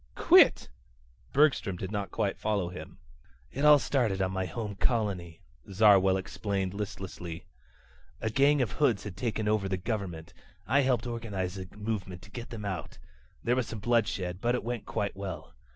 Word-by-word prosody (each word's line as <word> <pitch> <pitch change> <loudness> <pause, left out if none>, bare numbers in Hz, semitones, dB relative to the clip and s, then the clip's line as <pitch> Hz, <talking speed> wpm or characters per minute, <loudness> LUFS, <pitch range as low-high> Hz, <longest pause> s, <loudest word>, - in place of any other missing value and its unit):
"Quit?" - - +6 0.6
Bergstrom 140 -9 +3
did 95 +2 -5
not 100 -2 -3
quite 100 - -2
follow 100 -5 0
him. 90 - -9 0.5
"It 140 - -3 0.2
started 115 -5 0
on 95 -1 0
my 95 0 -2
home 105 +4 -4
colony," 95 -7 -1 0.3
Zarwell 95 -2 +5
explained 95 0 -3
listlessly. 95 -4 -6 0.7
"A 110 - -2
gang 140 +2 +4
of 115 - -3
hoods 125 -9 +1
had 105 -4 -7
taken 110 -3 -2
over 105 -2 +1
the 95 - 0
government. 90 -5 -4 0.3
I 130 +4 +3
helped 125 -4 +1
organize 100 -6 -4
a 90 - -7
movement 100 -4 -4
to 100 - -15
get 120 +1 -7
them 110 -3 -7
out. 95 -4 -5 0.5
There 120 - +2
was 125 -2 0
some 115 - -6
bloodshed, 100 -5 0
but 120 +1 +2
it - - -3
went 120 -1 -4
quite 100 -1 -2
well. 95 -5 -6
100 Hz, 165 wpm, -29 LUFS, 95-115 Hz, 0.7 s, Quit